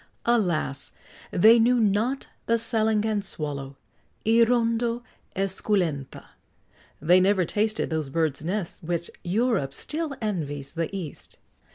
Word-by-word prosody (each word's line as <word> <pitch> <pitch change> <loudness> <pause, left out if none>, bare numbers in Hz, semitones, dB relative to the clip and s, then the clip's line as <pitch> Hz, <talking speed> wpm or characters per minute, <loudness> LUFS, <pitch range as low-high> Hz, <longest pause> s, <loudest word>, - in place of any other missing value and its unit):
Alas! 175 - +1 0.4
they 225 +6 +6
knew 245 +2 +4
not 220 +5 +1 0.2
the 230 - +3
"Salangan 220 -2 +1
swallow," 140 -6 -4 0.5
hirundo 230 +1 +2 0.3
esculenta; 185 -7 -1 0.7
they 175 +5 +5
never 190 -1 +3
tasted 215 +3 0
those 155 -3 -1
birds' 155 -1 0
nests 185 +1 -3
which 170 +1 -3
Europe 190 - 0
still 310 -2 -3
envies 145 -10 -3
the 165 -1 -2
East. 185 -7 -6
195 Hz, 105 wpm, -26 LUFS, 160-225 Hz, 0.7 s, they